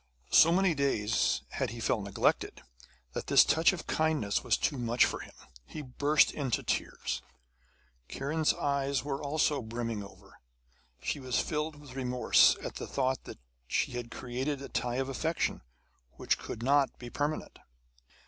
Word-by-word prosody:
So 165 - +7
many 185 0 +3
days 135 -7 +1
had - - -2
he 115 +2 -7
felt 115 -1 0
neglected 100 0 0 0.5
that - - -4
this - - +7
touch 160 +1 +4
of 190 - -6
kindness 155 -11 0
was 125 -3 +2
too 140 - -1
much 120 0 +3
for - - -3
him; - - -11 0.3
he 150 - -8
burst 145 +3 +3
into 135 -5 -2
tears. - - -2 0.9
Kiran's 155 +3 0
eyes 140 -1 -1
were 140 -1 -3
also 145 0 +1
brimming 115 -1 -4
over. 100 - -15 0.6
She - - -2
was 130 -2 -1
filled 150 0 -2
with 145 -3 -13
remorse 125 -1 +4
at - - -5
the - - -6
thought 130 -1 -1
that - - -9 0.3
she - - 0
had 120 -1 -5
created 130 +4 -3
a 140 - -8
tie 120 0 -2
of 135 +1 -1
affection, 160 +5 -1 0.5
which - - 0
could 115 - -6
not 140 +1 +3
be 120 -1 -9
permanent. 145 +1 -3
135 Hz, 160 wpm, -30 LUFS, 120-150 Hz, 0.9 s, So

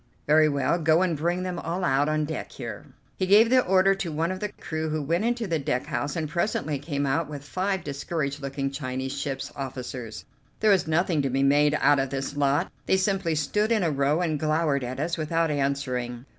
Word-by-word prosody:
"Very 155 +1 +5
well, 140 +4 +1
go 160 +2 +3
and 175 -3 0
bring 175 +4 -1
them 180 -2 -3
all 170 +3 -3
out 145 -2 +2
on 155 0 +1
deck 155 +1 -5
here." - - -7 0.3
He 185 - 0
gave 215 +4 +6
the 255 0 +6
order 190 +1 +4
to 190 -4 -4
one 165 +3 -1
of 185 - -4
the 210 - -2
crew, 160 -1 -4
who 155 0 -1
went 165 +8 0
into 240 -1 0
the 165 -5 -1
deck 125 -2 -1
house 145 +3 -3
and 160 -2 -2
presently 150 -3 -1
came 145 0 -2
out 140 +3 0
with 145 -2 -7
five 190 +4 -2
discouraged 145 0 -3
looking 135 0 -3
Chinese 130 -1 -4
ship's 140 -1 -4
officers. 125 -4 -6 0.3
There 215 -1 +4
was 190 -5 +3
nothing 160 -1 +1
to 135 - -1
be 135 +2 +1
made 145 +2 +4
out 145 -1 +4
of 135 0 0
this 135 +1 -4
lot; 145 +4 +1 0.2
they 190 - +4
simply 190 -4 0
stood 210 +9 0
in 220 -4 +3
a 165 - +1
row 140 +3 +1
and 155 -4 0
glowered 155 -3 +1
at 125 +2 -5
us 165 +3 -1
without 165 +1 0
answering. 130 -4 -2
155 Hz, 215 wpm, -26 LUFS, 140-175 Hz, 0.3 s, gave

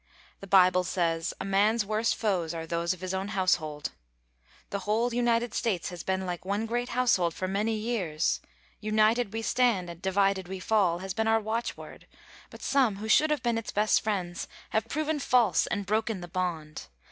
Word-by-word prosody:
The 195 - -10
Bible 185 -1 +5
says, 170 -2 -1
"A - - -4
man's 205 +3 +2
worst 215 +2 +1
foes 180 -7 -1
are 165 0 -4
those 170 +1 -1
of 185 -2 -4
his 185 0 -3
own 190 +1 -2
household." 175 -7 0 0.8
The 200 - -2
whole 225 +4 0
United 240 -1 +1
States 195 -7 -1
has 175 -2 -7
been 190 +1 -1
like 180 -1 -4
one 200 +4 -1
great 240 +2 -2
household 185 -10 +2
for 185 - -3
many 210 +4 0
years. 205 -9 -1 0.4
"United 215 +1 +2
we 225 0 -4
stand, 185 -10 +1
divided 190 -1 +1
we 190 0 -5
fall!" 185 -4 +2
has 190 - -3
been 220 +3 0
our 225 0 +4
watchword, 225 +2 -5 0.4
but - - -12
some 260 -7 +2
who 210 +3 -6
should 310 +7 +5
have 300 -4 0
been 235 -2 +1
its 225 - -8
best 210 +1 +3
friends 185 -5 -3 0.2
have 220 +1 0
proven 310 +3 -1
false 245 -7 +3
and 205 -2 -2
broken 215 0 0
the 175 - -7
bond. 170 -4 -4
200 Hz, 180 wpm, -28 LUFS, 180-225 Hz, 0.8 s, Bible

